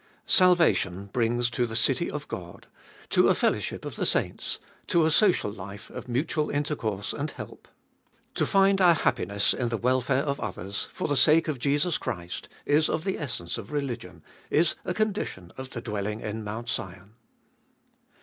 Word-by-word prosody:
1. - - -32 0.2
Salvation 170 - +4
brings 120 0 +1
to 125 0 0
the 110 - -6
city 130 +7 +2
of 150 0 -5
God, 85 -1 -8 0.5
to - - +5
a - - +4
fellowship - - -1
of - - -6
the - - 0
saints, - - 0 0.3
to 170 -2 +3
a 160 - +3
social 180 - +4
life 100 +1 -9
of - - -8
mutual 150 +5 0
Intercourse 115 -9 -2
and 150 +1 -3
help. - - -10 0.7
To - - 0
find 195 -1 +4
our 175 -2 +7
happiness 100 - +1
in 120 -2 -1
the 115 - -1
welfare 130 +3 +1
of 140 -2 -2
others, 100 0 -4
for - - -3
the 145 - +1
sake 155 +5 +5
of 150 -5 -2
Jesus 145 +6 +1
Christ, 90 -4 -5 0.2
is 150 +2 +3
of 155 - -1
the 190 0 -2
essence 115 - -3
of 105 -1 -9
religion, 120 - -4 0.3
is 160 +1 +3
a 180 - -2
condition 205 - -2
of 130 0 -7
the 120 - -6
dwelling 105 -1 -3
in 110 +1 -4
Mount 110 +3 -5
Sion. 95 0 -4
125 Hz, 175 wpm, -27 LUFS, 105-155 Hz, 0.7 s, our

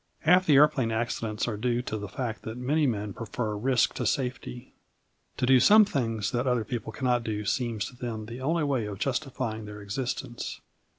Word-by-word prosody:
Half 180 +3 +4
the 150 - +6
aeroplane 135 -5 +4
accidents 110 -1 -2
are 110 -3 -2
due 120 +2 0
to 110 - -4
the 105 -1 -4
fact 120 -4 -4
that 110 +2 -6
many 145 +4 +1
men 105 -4 -2
prefer 115 -1 -3
risk 125 +3 +2
to - - -2
safety. 125 -1 -3 0.6
To - - +1
do 130 0 +6
some 210 - +7
things 115 - -1
that 120 +2 -1
other 125 -3 +1
people 110 -1 -4
cannot 125 +1 0
do 105 -2 -3
seems 115 -1 -1
to 125 - -9
them 115 -3 -5
the 120 +3 -8
only 160 +4 +1
way 130 -7 0
of 100 -2 -6
justifying 125 -3 -2
their 105 0 -8
existence. 120 +3 -4
120 Hz, 190 wpm, -28 LUFS, 110-130 Hz, 0.6 s, some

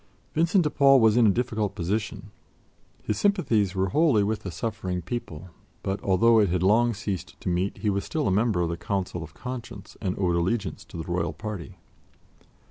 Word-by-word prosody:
Vincent 170 +4 +3
de 150 - +1
Paul 135 -2 +6
was 110 -2 +4
in 120 -2 +5
a - - +6
difficult 110 -2 -1
position. 105 +3 -3 0.7
His 105 - -2
sympathies 120 - +2
were 95 0 +1
wholly 140 - +3
with 105 +1 -1
the 95 - -5
suffering 95 -2 -4
people; 90 -4 -6 0.3
but, 95 +1 -2
although 110 +4 +4
it 105 -3 +3
had 90 0 0
long 115 +4 +3
ceased 95 -2 -5
to - - -3
meet, 90 +3 -1
he 105 - -1
was 100 0 -1
still 155 -3 -2
a - - +2
member 105 -1 +2
of 85 - 0
the 85 - -3
Council 90 -1 -3
of 80 +1 -10
Conscience 120 -5 -8
and 95 -3 -2
owed 90 -3 +1
allegiance 95 +5 -1
to - - -10
the 80 - -4
Royal 85 -1 -2
party. 105 -6 -7
100 Hz, 195 wpm, -26 LUFS, 90-115 Hz, 0.7 s, Paul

